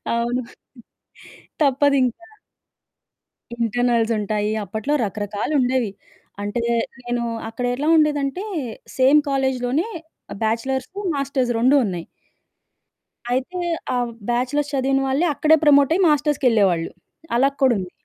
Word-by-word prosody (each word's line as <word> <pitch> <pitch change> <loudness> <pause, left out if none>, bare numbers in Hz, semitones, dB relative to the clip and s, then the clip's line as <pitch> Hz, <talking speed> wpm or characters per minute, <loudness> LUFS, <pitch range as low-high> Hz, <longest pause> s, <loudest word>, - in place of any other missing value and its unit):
అవును. 240 +2 -1 1.2
తప్పదు 280 0 +3
ఇంకా. 340 +9 -5 1.3
ఇంటర్నల్స్ 235 0 +1
ఉంటాయి. 210 0 -1
అప్పట్లో 220 +9 -2
రకరకాలుండేవి. 220 +4 -1 0.5
అంటే 205 +3 -2 0.4
నేను 240 0 -2 0.3
అక్కడ 225 +2 -5
ఎట్లా 290 +5 -2
ఉండేదంటే, 300 +3 +1 0.5
సేమ్ 270 +3 +6
కాలేజిలోనే 265 - 0 0.5
ఆహ్, - - -8
బ్యాచిలర్స్, 250 +4 -1 0.3
మాస్టర్స్ 275 -3 -1
2 255 +5 +4
ఉన్నయి. 175 -4 -4 1.3
అయితే, 265 +9 -2 0.4
ఆహ్, 245 -1 -1 0.2
బ్యాచిలర్స్ 265 +5 0
చదివిన 270 0 +1
వాళ్ళే 275 +6 +1
అక్కడే 315 +3 +4
ప్రమోటయి 295 +4 +5
మాస్టర్స్‌కెళ్ళేవాళ్ళు 245 - +2 0.5
అలా 270 +3 +4
కూడా 260 -2 +5
ఉంది. 180 -2 -5
255 Hz, 100 wpm, -21 LUFS, 230-280 Hz, 1.3 s, సేమ్